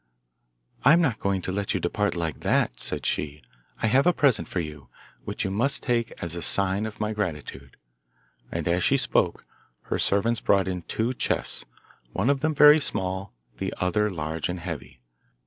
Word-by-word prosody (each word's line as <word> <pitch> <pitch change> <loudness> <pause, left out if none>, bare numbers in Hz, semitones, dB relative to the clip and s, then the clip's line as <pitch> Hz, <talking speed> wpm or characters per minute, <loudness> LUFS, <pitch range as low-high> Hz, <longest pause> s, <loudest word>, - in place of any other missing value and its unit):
'I 140 - +7
am 170 - +5
not 135 -10 +1
going 95 -2 -1
to - - -3
let 100 +1 -1
you - - +1
depart 105 +4 -1
like 85 -2 -3
that,' - - +1
said - - -1
she; 75 0 -2 0.4
'I - - +4
have 130 +8 +4
a 180 - +5
present 135 -9 +2
for 90 - -3
you, 75 -3 -7 0.4
which - - -3
you 95 - -1
must 120 +8 0
take 120 -2 0
as 85 -2 -3
a 85 - -5
sign 100 +5 +2
of 110 - -10
my 105 0 -1
gratitude.' 75 - -5 0.7
And 85 -1 -3
as 85 +1 +1
she - - +4
spoke, - - +1 0.4
her - - -2
servants 110 +4 +2
brought 100 -2 +3
in 90 -1 -3
two 110 +8 -1
chests, - - -1 0.5
one 135 - +2
of 140 - 0
them 155 +2 0
very 150 +2 +8
small, 95 -8 -2 0.3
the - - -2
other 100 +4 +1
large 80 -3 -3
and 90 0 -3
heavy. 85 -7 -7
100 Hz, 185 wpm, -26 LUFS, 85-115 Hz, 0.7 s, very